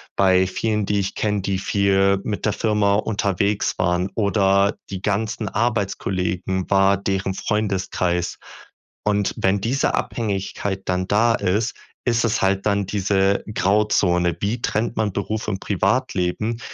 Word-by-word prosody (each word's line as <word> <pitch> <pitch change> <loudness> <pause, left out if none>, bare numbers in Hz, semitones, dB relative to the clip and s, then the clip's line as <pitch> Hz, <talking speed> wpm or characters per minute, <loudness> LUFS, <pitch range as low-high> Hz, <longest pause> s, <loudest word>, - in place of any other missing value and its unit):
bei 95 -1 +4
vielen, 105 +2 -1
die 100 0 +1
ich 95 - -3
kenne, 105 -2 -1
die 95 0 -1
viel 100 0 +2
mit 105 0 -3
der 105 - +1
Firma 105 -2 +2
unterwegs 100 -1 0
waren, 90 +1 +1
oder 100 -1 +2
die 95 -2 -5
ganzen 110 +2 -1
Arbeitskollegen 95 -4 -1
war 100 0 +4
deren 95 0 -2
Freundeskreis. 95 -4 -1 0.7
Und 105 -1 +1
wenn 95 +1 +1
diese 120 +7 0
Abhängigkeit 100 -2 -3
dann 90 0 -1
da 115 +3 +3
ist, 105 +6 0 0.3
ist 115 -2 +2
es 115 0 0
halt 95 0 +1
dann 100 -2 +1
diese 100 0 +1
Grauzone. 90 -4 +2
Wie 110 +4 -2
trennt 115 +1 -1
man 110 -2 +1
Beruf 110 +2 -3
und 95 -3 -2
Privatleben? 105 +1 0
100 Hz, 135 wpm, -22 LUFS, 95-105 Hz, 0.7 s, bei